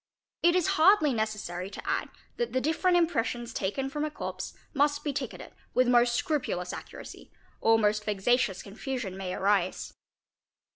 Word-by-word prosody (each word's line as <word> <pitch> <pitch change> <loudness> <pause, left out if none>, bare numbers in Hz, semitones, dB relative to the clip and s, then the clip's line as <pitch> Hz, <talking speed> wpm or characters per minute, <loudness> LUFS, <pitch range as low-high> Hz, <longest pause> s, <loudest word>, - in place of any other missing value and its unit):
It 345 +1 +4
is 365 -3 +3 0.2
hardly 320 -5 +6
necessary 210 -5 -3
to - - -9
add - - 0 0.3
that 475 -1 -2
the 260 - +2
different 325 +6 +2
impressions 240 -8 0
taken 230 +8 -2
from 295 +2 -3
a 305 - -1
corpse 300 - -6 0.2
must 290 0 +2
be 290 - -1
ticketed 275 - -5 0.2
with 255 0 +4
most 240 -1 +4
scrupulous 250 - -1
accuracy, - - -10 0.3
or 225 0 +4
most 210 -1 +2
vexatious 210 0 +1
confusion 220 -1 -5
may 190 -1 -4
arise. 195 -2 0
245 Hz, 150 wpm, -29 LUFS, 205-295 Hz, 0.3 s, hardly